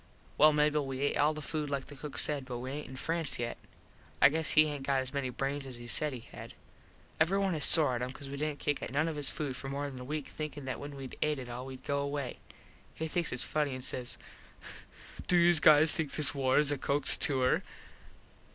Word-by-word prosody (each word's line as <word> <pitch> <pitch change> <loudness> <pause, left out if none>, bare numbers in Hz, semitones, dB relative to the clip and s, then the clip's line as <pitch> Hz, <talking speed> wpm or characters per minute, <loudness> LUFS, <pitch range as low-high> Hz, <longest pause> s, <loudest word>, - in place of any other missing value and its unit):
Well 155 +1 +7
Mable, 150 -1 +2
we 135 +2 -1
et - - -2
all 150 +2 +3
the 155 - -6
food 150 0 -2
like 140 -2 -2
the 145 - -11
cook 145 +1 -8
said 145 -3 +1
but 125 -2 -5
we 130 +2 -5
aint 150 +2 -5
in 130 - -9
France 165 +2 -1
yet. 120 -1 -3 0.6
I 140 - +8
guess 160 +1 +1
he 155 - +8
aint 145 -2 -4
got 135 -1 +2
as 130 +1 -6
many 140 -3 -1
brains 135 +2 -3
as 130 - -6
he 120 0 -10
said 150 +5 -2
he 125 -3 -7
had. - - -10 0.6
Everyone 190 +3 +2
is 150 -3 +3
sore 150 -6 +5
at 120 - -2
him 125 +1 -3
cause 135 +1 -9
we 140 - -6
didnt 150 0 -2
kick 145 0 -1
at - - -4
none 150 +4 +1
of 160 - -3
his 145 -2 +1
food 145 -4 -3
for 135 - -6
more 140 +1 -3
than 130 - -9
a - - -7
weak 150 +2 -4
thinkin 150 -2 -6
that 130 - -4
when 145 0 -7
wed 135 -2 -8
et 150 -1 +1
it 125 -2 -7
all 125 +2 -6
wed 130 -1 -9
go 140 0 -1
away. 140 -2 -3 0.6
He 160 - -3
thinks 170 +1 -1
its 125 - 0
funny 150 -3 -1
an 130 - -7
says 125 -1 -1 1.1
"Do 180 - +4
youse 170 -1 +5
guys 155 +1 +6
think 160 -6 -1
this 145 -2 +1
war 130 -2 +2
is 150 -1 +4
a 145 - -1
Cooks 145 +1 +4
tour?" 130 -3 +2
145 Hz, 245 wpm, -31 LUFS, 130-150 Hz, 1.1 s, I